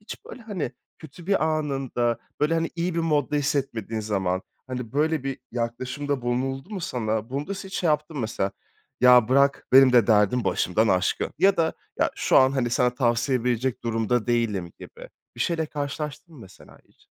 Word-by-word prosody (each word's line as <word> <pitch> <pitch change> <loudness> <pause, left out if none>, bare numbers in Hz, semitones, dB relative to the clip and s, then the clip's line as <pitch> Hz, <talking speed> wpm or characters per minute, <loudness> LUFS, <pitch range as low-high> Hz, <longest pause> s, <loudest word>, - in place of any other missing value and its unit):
Hiç, 210 - -10
böyle, 250 - -11
hani, 190 - -4 0.3
kötü 160 +3 -13
bir 195 -5 +2
anında, 135 -6 -1 0.2
böyle, 150 +2 +2
hani, 165 0 0
iyi 170 +1 -1
bir 170 - 0
modda 150 -3 +1
hissetmediğin 130 -6 -1
zaman, 95 -3 -1 0.2
hani, 125 -2 -6
böyle 150 -1 +1
bir 135 0 -3
yaklaşımda 130 +4 -3
bulunuldu 135 - -2
mu 200 - -4
sana? 110 -7 -2
Bunda 145 +9 -3
sen 195 0 -8
hiç 195 - -10
şey 180 - -1
yaptın 150 +1 0
mı, 135 - -2
mesela? 105 -3 -2 0.5
"Ya 125 -2 +7
bırak, 140 +1 +3
benim 130 -1 +8
de 120 -4 +5
derdim 110 +3 +3
başımdan 110 +5 +1
aşkın." 90 0 +1
ya 195 +1 +4
da 160 -1 +1 0.3
"Ya - - +2
şu, - - +2
hani, 130 -2 +2
sana 125 0 +2
tavsiye 120 0 +1
verecek 125 +1 -1
durumda 115 0 0
değilim." 105 -8 0
gibi - - -11 0.3
bir - - -9
şeyle 165 -2 0
karşılaştın 150 +2 -5
mı, 130 - -13
mesela, 95 -3 -15
hiç? - - -29
130 Hz, 180 wpm, -25 LUFS, 115-150 Hz, 0.5 s, benim